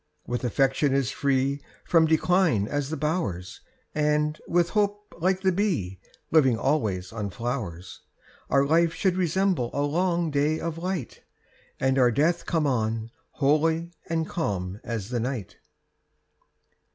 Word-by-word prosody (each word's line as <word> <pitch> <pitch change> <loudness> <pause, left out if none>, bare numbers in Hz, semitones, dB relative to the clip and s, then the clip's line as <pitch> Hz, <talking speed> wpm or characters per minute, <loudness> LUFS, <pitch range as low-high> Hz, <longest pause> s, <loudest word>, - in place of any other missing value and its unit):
With 125 +1 -3
affection 135 +3 +2
as 135 -3 +1
free 140 0 0 0.2
From 165 -2 +4
decline 160 - +3
as 145 +1 -2
the 160 - -3
bowers, 145 - -2 0.3
And, 150 0 +1
with 175 0 +2
hope, 205 -1 -1
like 185 +2 +1
the 190 -1 +3
bee, 170 - -1 0.3
Living 135 -7 +5
always 110 -9 -1
on 105 -3 -3
flowers, 95 -5 -5 0.5
Our 140 +1 +4
life 165 +2 +3
should 185 +1 +1
resemble 185 -6 +1
a 140 - +1
long 170 +2 +1
day 145 +2 +1
of 165 -1 -4
light, 180 -7 -4 0.6
And 130 0 +2
our 125 -1 +5
death 160 +8 +1
come 160 -3 +1
on, 115 -3 -1 0.2
holy 160 +4 +1 0.2
and 165 -1 0
calm 95 - -3
as 110 -3 -4
the 120 -1 -1
night. 120 -4 -4
145 Hz, 140 wpm, -26 LUFS, 120-170 Hz, 0.6 s, Living